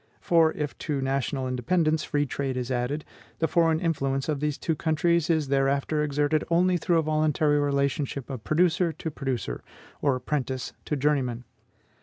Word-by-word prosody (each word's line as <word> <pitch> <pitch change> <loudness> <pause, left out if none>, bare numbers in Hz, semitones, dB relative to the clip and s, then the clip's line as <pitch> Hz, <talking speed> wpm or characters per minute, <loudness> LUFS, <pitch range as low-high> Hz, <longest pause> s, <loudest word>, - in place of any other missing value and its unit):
For, 165 -2 +4
if 150 -2 -4
to 150 -3 -2
national 135 0 -1
independence 155 +5 +1
free 145 0 0
trade 135 -1 -3
is 125 0 -3
added, 130 +5 -1 0.3
the 160 - +1
foreign 165 -2 +3
influence 135 -5 -1
of 150 -3 -1
these 150 -1 -1
two 160 - -1
countries 170 +1 +1
is 155 -4 +1
thereafter 140 +2 +1
exerted 145 +1 +1
only 180 +2 +3
through 170 +1 +1
a 165 - +2
voluntary 155 -1 +2
relationship 140 -1 -1
of 130 -5 -6
producer 170 +1 +2
to 160 +1 -5
producer, 130 - -3 0.4
or 140 -3 +2
apprentice 130 -2 -3
to 150 - -1
journeyman. 135 -4 0
145 Hz, 160 wpm, -26 LUFS, 135-160 Hz, 0.4 s, For